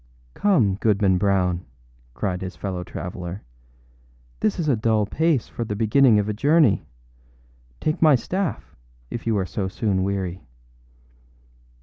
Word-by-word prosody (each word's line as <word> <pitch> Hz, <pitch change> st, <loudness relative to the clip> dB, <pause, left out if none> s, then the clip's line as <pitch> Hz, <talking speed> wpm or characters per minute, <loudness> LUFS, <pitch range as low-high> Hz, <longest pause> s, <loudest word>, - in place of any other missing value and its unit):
âCome, 115 Hz, -, +2 dB
Goodman 100 Hz, -4 st, +2 dB
Brown,â 90 Hz, -3 st, +1 dB, 0.5 s
cried 90 Hz, +8 st, -2 dB
his 95 Hz, 0 st, -6 dB
fellow 95 Hz, -3 st, -4 dB
traveller, 90 Hz, +1 st, -6 dB, 1.0 s
âthis 110 Hz, -, +1 dB
is 165 Hz, -, -2 dB
a 140 Hz, -, +3 dB
dull 110 Hz, -1 st, +1 dB
pace 155 Hz, +3 st, +1 dB
for 120 Hz, -, -5 dB
the 105 Hz, -2 st, -4 dB
beginning 115 Hz, +2 st, +4 dB
of 105 Hz, 0 st, +1 dB
a 105 Hz, -, -1 dB
journey. 140 Hz, -, +3 dB, 0.9 s
Take 155 Hz, -, -1 dB
my 155 Hz, -3 st, +7 dB
staff, 185 Hz, +8 st, -3 dB, 0.4 s
if 115 Hz, -, -5 dB
you 110 Hz, -2 st, +2 dB
are 95 Hz, -, 0 dB
so 95 Hz, +2 st, -3 dB
soon 95 Hz, -1 st, -1 dB
weary. 95 Hz, -1 st, -2 dB
105 Hz, 135 wpm, -23 LUFS, 95-125 Hz, 1.0 s, my